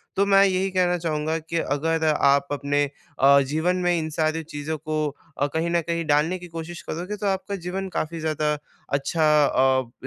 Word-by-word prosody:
तो 200 Hz, +1 st, +3 dB
मैं 195 Hz, 0 st, +6 dB
यही 190 Hz, 0 st, +1 dB
कहना 180 Hz, -1 st, +2 dB
चाहूँगा 160 Hz, -1 st, -1 dB
कि 165 Hz, +1 st, -4 dB
अगर 160 Hz, +3 st, 0 dB
आप, 140 Hz, -2 st, +3 dB
अपने 145 Hz, 0 st, 0 dB, 0.4 s
अ, 140 Hz, +1 st, +6 dB
जीवन 160 Hz, +5 st, 0 dB
में 175 Hz, -1 st, +3 dB
इन 160 Hz, -1 st, -2 dB
सारी 155 Hz, +1 st, 0 dB
चीज़ों 155 Hz, 0 st, -5 dB
को 155 Hz, 0 st, -4 dB, 0.4 s
अ, 145 Hz, -, +1 dB
कहीं 165 Hz, +1 st, 0 dB
न 170 Hz, 0 st, +2 dB
कहीं 170 Hz, 0 st, -2 dB
डालने 155 Hz, +5 st, +2 dB
की 175 Hz, -, -10 dB
कोशिश 165 Hz, +1 st, -7 dB
करोगे, 180 Hz, +6 st, -4 dB
तो 205 Hz, -, -5 dB
आपका 195 Hz, +1 st, -1 dB
जीवन 190 Hz, +2 st, -3 dB
काफ़ी 165 Hz, +1 st, -2 dB
ज़्यादा 155 Hz, -1 st, 0 dB, 0.4 s
अच्छा 155 Hz, +3 st, +1 dB, 0.2 s
अ, 130 Hz, -2 st, +2 dB
160 Hz, 185 wpm, -24 LUFS, 150-175 Hz, 0.4 s, मैं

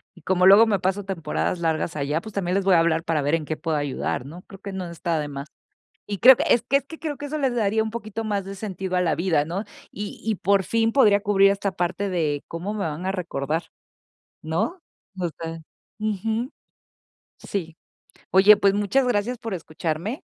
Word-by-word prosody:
y -, -, -16 dB
como 185 Hz, -1 st, +2 dB
luego 200 Hz, +4 st, +8 dB
me 205 Hz, -3 st, +1 dB
paso 190 Hz, +2 st, -1 dB
temporadas 175 Hz, -1 st, -2 dB
largas 160 Hz, -1 st, -1 dB
allá, 150 Hz, +2 st, -1 dB
pues, 220 Hz, +2 st, -10 dB
también 185 Hz, -2 st, -1 dB
les 195 Hz, -1 st, 0 dB
voy 190 Hz, -2 st, +5 dB
a -, -, +6 dB
hablar 165 Hz, -1 st, +2 dB
para 165 Hz, -3 st, 0 dB
ver 145 Hz, +3 st, +2 dB
en 160 Hz, -2 st, -3 dB
qué 155 Hz, -, -3 dB
puedo 160 Hz, -3 st, -1 dB
ayudar, 140 Hz, -3 st, -2 dB
¿no? 170 Hz, +6 st, -10 dB
Creo 195 Hz, -, -13 dB
que 200 Hz, -1 st, -6 dB
no 185 Hz, -2 st, -4 dB
está 170 Hz, -1 st, -2 dB
de 150 Hz, -, -3 dB
más. 140 Hz, 0 st, -6 dB, 0.6 s
Y 200 Hz, -1 st, -4 dB
creo 255 Hz, +4 st, +9 dB
que -, -, -1 dB
es 235 Hz, -, +4 dB
que 275 Hz, -, +3 dB
es 275 Hz, -, -11 dB
que, 320 Hz, +3 st, -11 dB
creo 305 Hz, -3 st, -4 dB
que 290 Hz, -, -6 dB
eso 305 Hz, +2 st, -3 dB
les 265 Hz, -4 st, 0 dB
daría 220 Hz, -1 st, +1 dB
un 220 Hz, -, -3 dB
poquito 225 Hz, -1 st, -5 dB
más 205 Hz, -3 st, -1 dB
de 195 Hz, +1 st, -7 dB
sentido 190 Hz, -2 st, -4 dB
a -, -, +3 dB
la 170 Hz, -3 st, +2 dB
vida, 165 Hz, -4 st, +1 dB
¿no?, 180 Hz, +7 st, -4 dB, 0.3 s
y 205 Hz, 0 st, -7 dB
y 220 Hz, 0 st, +1 dB
por 200 Hz, +1 st, +2 dB
fin, 225 Hz, +2 st, +1 dB
podría 210 Hz, -7 st, +5 dB
cubrir 195 Hz, -1 st, +4 dB
esta 200 Hz, 0 st, -1 dB
parte 185 Hz, +3 st, -2 dB
de 155 Hz, -6 st, -1 dB
cómo 175 Hz, +5 st, -4 dB
me 215 Hz, -, -4 dB
van 160 Hz, +2 st, -4 dB
a 190 Hz, -, 0 dB
recordar, 165 Hz, -4 st, -2 dB, 0.8 s
¿no?, 165 Hz, -, -1 dB, 0.4 s
no 180 Hz, -2 st, -2 dB
sé. 165 Hz, 0 st, -6 dB, 0.4 s
Ujú. 220 Hz, +3 st, -2 dB, 0.9 s
Sí. 165 Hz, -5 st, -5 dB, 0.6 s
Oye, 200 Hz, +3 st, +7 dB
pues 200 Hz, -1 st, +3 dB
muchas 205 Hz, +6 st, +1 dB
gracias 245 Hz, +1 st, 0 dB
por 225 Hz, -3 st, -5 dB
escucharme. 165 Hz, -, -4 dB
190 Hz, 215 wpm, -24 LUFS, 165-215 Hz, 0.9 s, creo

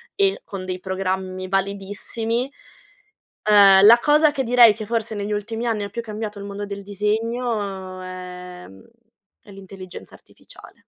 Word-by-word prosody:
e 395 Hz, -1 st, +1 dB
con 195 Hz, -2 st, -7 dB
dei 185 Hz, 0 st, -4 dB
programmi 185 Hz, 0 st, -3 dB
validissimi. 205 Hz, +6 st, -2 dB, 1.0 s
Ehm, 200 Hz, -1 st, +7 dB
la 235 Hz, +2 st, +9 dB
cosa 300 Hz, 0 st, +4 dB
che 275 Hz, -2 st, -1 dB
direi 235 Hz, -2 st, +7 dB
che 215 Hz, -, -7 dB
forse 225 Hz, -1 st, -2 dB
negli 205 Hz, 0 st, -4 dB
ultimi 225 Hz, +3 st, -3 dB
anni 210 Hz, -3 st, -1 dB
più 235 Hz, -, -4 dB
cambiato 215 Hz, -1 st, -6 dB
il 200 Hz, -, -7 dB
mondo 200 Hz, +1 st, -6 dB
del 200 Hz, 0 st, -7 dB
disegno 210 Hz, -2 st, -3 dB
è 180 Hz, -1 st, -9 dB
mhmm, 95 Hz, 0 st, -16 dB, 0.6 s
è 205 Hz, -, -17 dB
l'intelligenza 190 Hz, -1 st, -11 dB
artificiale. -, -, -16 dB
205 Hz, 145 wpm, -22 LUFS, 190-225 Hz, 1.0 s, la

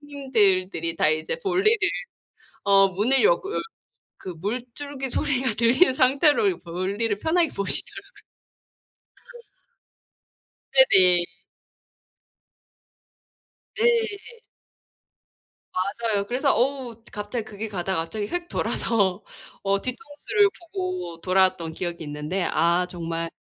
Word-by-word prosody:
형님들들이 200 Hz, -, 0 dB
다 -, -, +3 dB
이제 155 Hz, -, -1 dB
볼일을 400 Hz, +3 st, +3 dB, 0.9 s
어 195 Hz, -1 st, +5 dB
문을 225 Hz, -, +1 dB
여고 435 Hz, -3 st, +2 dB
열 -, -, 0 dB, 0.6 s
그 185 Hz, -, -6 dB
물줄기 250 Hz, -, -5 dB
소리가 260 Hz, -4 st, 0 dB
들린 255 Hz, +6 st, +4 dB
상태로 295 Hz, -, +3 dB
볼일을 195 Hz, +5 st, -2 dB
편하게 330 Hz, +5 st, +1 dB
보시더라고요. 200 Hz, -1 st, -5 dB, 2.5 s
네네. 185 Hz, -, +6 dB, 2.5 s
네. 450 Hz, -1 st, 0 dB, 1.8 s
맞아요. 200 Hz, -, -3 dB
그래서 270 Hz, +3 st, +1 dB
어우 250 Hz, -3 st, -1 dB
갑자기 210 Hz, +2 st, -4 dB
그 205 Hz, -, -12 dB
길 220 Hz, +1 st, -4 dB
가다가 190 Hz, -3 st, -2 dB
갑자기 205 Hz, +4 st, -5 dB
홱 350 Hz, +4 st, -4 dB
돌아서 200 Hz, -4 st, 0 dB, 0.4 s
어 195 Hz, 0 st, +1 dB
뒤통수를 300 Hz, -, 0 dB
보고 365 Hz, -, -5 dB
돌아왔던 185 Hz, -3 st, +1 dB
기억이 170 Hz, -1 st, -5 dB
있는데 150 Hz, +5 st, -3 dB
아 170 Hz, +2 st, +1 dB
정말 165 Hz, -1 st, -4 dB
225 Hz, 225 characters per minute, -24 LUFS, 185-295 Hz, 2.5 s, 네네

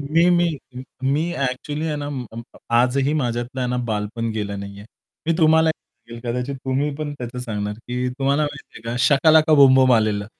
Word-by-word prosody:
मी 165 Hz, +5 st, +2 dB
मी 175 Hz, -1 st, +3 dB, 0.5 s
मी 150 Hz, +6 st, 0 dB
actually 145 Hz, +4 st, -3 dB
आहे 150 Hz, -2 st, -2 dB
ना, 145 Hz, 0 st, -4 dB
म-म 120 Hz, -4 st, -6 dB, 0.3 s
आजही 130 Hz, +4 st, +2 dB
माझ्यातलं 125 Hz, -1 st, -2 dB
ना 125 Hz, -, -1 dB
बालपण 110 Hz, +2 st, -2 dB
गेलं 100 Hz, -2 st, -4 dB
नाहीये. 100 Hz, +1 st, -9 dB, 0.4 s
मी 165 Hz, -, +3 dB
तुम्हाला 160 Hz, 0 st, +5 dB
सांगेल 115 Hz, -6 st, -11 dB
कदाचित 125 Hz, +3 st, -3 dB
तुम्ही 135 Hz, +3 st, 0 dB
पण 150 Hz, -1 st, -4 dB
त्याचं 125 Hz, 0 st, -6 dB
सांगणार 105 Hz, -4 st, -3 dB
की 125 Hz, +1 st, -2 dB
तुम्हाला 140 Hz, +2 st, +1 dB
माहिती 145 Hz, -, -5 dB
आहे -, -, -12 dB
का 120 Hz, -, -3 dB
शकालाका 155 Hz, +2 st, +5 dB
बुमबुम 130 Hz, -2 st, +6 dB
आलेलं. 105 Hz, -2 st, +1 dB
130 Hz, 165 wpm, -21 LUFS, 115-150 Hz, 0.5 s, बुमबुम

